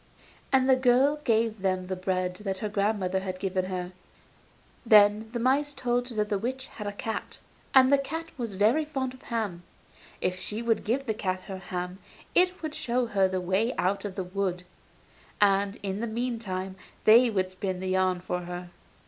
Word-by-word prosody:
And 265 -1 +4
the 260 - +6
girl 260 +3 +4
gave 225 -3 +1
them 185 -1 0
the 185 +1 -3
bread 185 -1 -1
that 195 -2 -3
her 210 +2 -3
grandmother 200 -2 0
had 185 -1 -4
given 185 -1 -1
her. 180 -1 -4 0.9
Then 215 -1 +5
the 240 - -3
mice 280 +4 +1
told 245 -1 0
her 235 - -8
that 210 -1 0
the 205 - 0
witch 260 +4 -3
had 210 -5 -8
a - - -1
cat, 220 +2 -4 0.4
and 260 +1 +7
the 280 - +6
cat 325 +4 -4
was 230 -6 -4
very 220 +11 +3
fond 270 -4 -3
of 260 - -15
ham; 215 -7 -3 0.6
if 185 0 -1
she 215 +4 -4
would 225 -2 +1
give 260 +5 0
the 220 - 0
cat 185 -3 -2
her 190 0 -7
ham, 180 0 -5 0.3
it 365 -1 +3
would 310 -1 -3
show 250 -4 0
her 200 -4 +2
the 185 0 -2
way 190 +7 0
out 195 +2 0
of 200 -3 -5
the 190 - -2
wood, 180 -1 -2 0.8
and 200 0 +3
in 195 0 -2
the 235 - -2
meantime 220 -5 -3 0.3
they 235 +3 +7
would 190 -4 -1
spin 185 -1 -3
the 190 0 -3
yarn 185 -1 +1
for 180 0 -2
her. 175 0 -7
205 Hz, 190 wpm, -28 LUFS, 185-245 Hz, 0.9 s, and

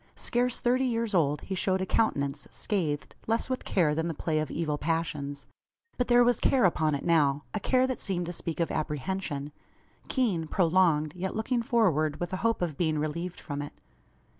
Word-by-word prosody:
Scarce 245 0 0
thirty 255 +2 +2
years 230 -3 -1
old, 150 -5 +2
he 195 - -5
showed 190 0 +1
a 190 - -1
countenance, 140 -10 0
scathed, 160 -9 -2
less 225 +3 0
with 255 - -2
care 165 -6 +2
than 160 +2 -1
the 165 - -3
play 155 +1 0
of 155 - -2
evil 150 -3 -2
passions. 145 -3 -2 0.5
But 250 - 0
there 245 0 +6
was 240 -1 +3
care 255 -5 +3
upon 155 -4 +2
it 140 - -5
now 145 -4 +3
a 215 - -1
care 255 +5 +3
that 260 -1 -3
seemed 180 -3 -1
to 175 - -5
speak 165 -1 -4
of 170 - 0
apprehension 150 -1 -3 0.6
keen, 200 - 0
prolonged, 165 -4 +2
yet 185 +1 -3
looking 235 +3 0
forward 170 - +2
with 175 +1 -4
a - - 0
hope 230 -1 0
of 155 -5 -3
being 160 -3 +1
relieved 165 +4 -3
from 145 -2 -5
it. 145 - -7
170 Hz, 190 wpm, -28 LUFS, 150-220 Hz, 0.6 s, there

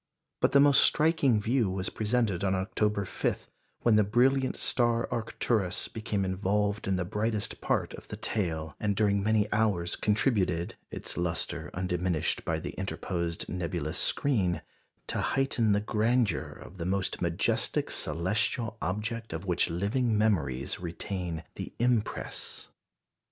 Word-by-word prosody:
But - - +2
the 140 - +7
most 140 -1 +7
striking 150 -7 +4
view 115 0 +1
was 95 0 -2
presented 110 -4 0
on 95 -1 +2
October 100 +1 0
5, - - -2 0.3
when 115 -2 +4
the 105 - +5
brilliant 130 +5 +2
star 120 -1 +2
Arcturus 110 -4 0
became 105 -3 -2
involved 100 +2 0
in 95 - +2
the 90 -1 -1
brightest 105 +2 -2
part - - 0
of - - -10
the - - -6
tail, 80 -7 -2
and 105 -1 0
during 100 -1 +2
many 105 0 +2
hours 100 -6 +1
contributed, 100 -6 +1 0.2
its - - -5
lustre 85 -1 -2
undiminished 90 -2 -1
by - - -1
the - - -5
interposed 85 -2 -3
nebulous 85 -2 -3
screen, 100 -12 +1 0.4
to - - -2
heighten 125 -5 +1
the 100 - +4
grandeur 110 - +1
of 95 - -12
the 85 - -3
most 95 0 -1
majestic 85 -1 0
celestial 105 +7 0
object 110 +4 -3
of 80 +4 -5
which 90 -2 +1
living 105 +7 0
memories 75 - +1
retain 85 -1 -4
the - - -7
impress. 120 -2 -1
100 Hz, 140 wpm, -29 LUFS, 90-115 Hz, 0.4 s, the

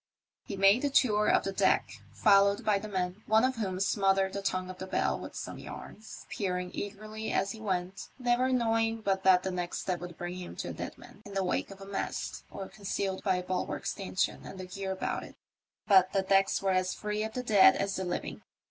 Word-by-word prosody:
He 200 - -5
made 195 +5 +5
the 285 - +1
tour 210 -6 +3
of - - +4
the 195 - -2
deck, 195 - +1
followed 200 -1 +4
by 205 -2 +3
the 215 - -7
men, 185 0 -2
one 220 +2 +4
of 260 -1 +1
whom 190 -4 -2
smothered 195 0 +2
the 200 - -3
tongue 185 -1 -2
of 185 - -13
the 190 - -5
bell - - 0
with - - -8
some - - -6
yarns, 220 0 -10
peer 185 -3 -2
ing 180 0 -4
eagerly 215 +2 -5
as 195 - +1
he 220 - -9
went, 185 -2 -3
never 250 0 +2
knowing 225 -2 +1
but 195 -2 0
that 185 -1 +6
the 190 - -2
next 180 -1 -3
step 180 -2 -2
would 175 -1 -8
bring 175 +1 -5
him 180 -1 -7
to - - -4
a - - -4
dead - - -6
man - - -15
in 200 -1 -10
the 195 - +1
wake 180 - -1
of 195 0 -11
a - - -8
mast, 195 0 -4
or 195 - -7
concealed 195 -1 -3
by 190 -2 +2
a 180 - -2
bulwark 185 0 -3
stanchion 190 -1 -1
and 190 - -9
the 185 - -5
gear 190 +1 -5
about 190 - -2
it; - - -11 0.5
but 190 -2 +6
the 195 - +2
decks 195 0 +3
were 195 - +2
as 185 0 +1
free 210 0 -3
of 220 0 -4
the 250 - -3
dead 210 -5 +7
as 195 0 -1
the 190 - -2
living. 175 - -4
195 Hz, 230 wpm, -30 LUFS, 185-210 Hz, 0.5 s, dead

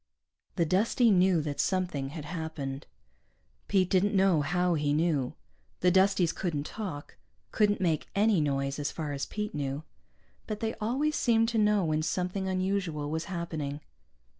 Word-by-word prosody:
The 170 - +2
Dustie 215 +7 +3
knew 185 -3 +4
that 145 -2 -4
something 180 -8 0
had 150 0 -7
happened. 150 -4 -5 0.8
Pete 185 -2 +2
didn't 200 +2 +3
know 190 -5 +4
how 180 +3 +1
he 145 -2 +1
knew. 155 -4 0 0.5
The 180 - +4
Dusties 190 -2 +3
couldn't 155 -6 -2
talk, 180 -10 -6 0.3
couldn't 205 -1 +2
make 165 -5 0
any 205 -3 +3
noise, 140 -1 -1
as 145 - -2
far 155 -3 -4
as 140 -1 -3
Pete 210 0 -4
knew. 140 0 -3 0.6
But 215 -1 -4
they 225 -1 -1
always 275 +8 0
seemed 230 -2 +3
to 230 -2 0
know 210 -3 +3
when 155 -1 +1
something 180 +4 -2
unusual 185 -6 -1
was 160 +1 -2
happening. 160 -5 -4
175 Hz, 155 wpm, -29 LUFS, 150-200 Hz, 0.8 s, knew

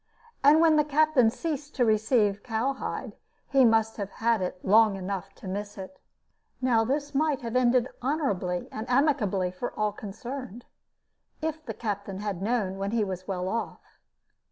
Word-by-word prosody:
And 290 +3 +7
when 320 -2 +5
the 300 - +5
captain 295 -4 +3
ceased 295 +2 -4
to 250 - +3
receive 215 -2 +2
cowhide, 250 +3 -3 0.4
he 270 -2 +5
must 225 -1 +3
have 200 -2 -4
had 230 -2 +1
it 180 0 -3
long 215 +1 +5
enough 195 0 -5
to - - -11
miss 205 +2 -5
it. 195 +9 -9 0.6
Now 245 -3 +3
this 285 +5 -2
might 295 -1 +1
have 230 +1 -4
ended 250 0 +3
honorably 205 - -1
and 220 +2 -6
amicably 225 - +2
for 185 +7 -5
all 210 0 +2
concerned, 235 +4 -7 0.7
if 315 0 -3
the 225 -7 -6
captain 200 -3 -4
had 200 -3 -4
known 200 -3 -1
when 195 0 -1
he 225 0 +1
was 185 -2 -5
well 185 -1 -2
off. 230 +4 -5
225 Hz, 160 wpm, -27 LUFS, 200-270 Hz, 0.7 s, And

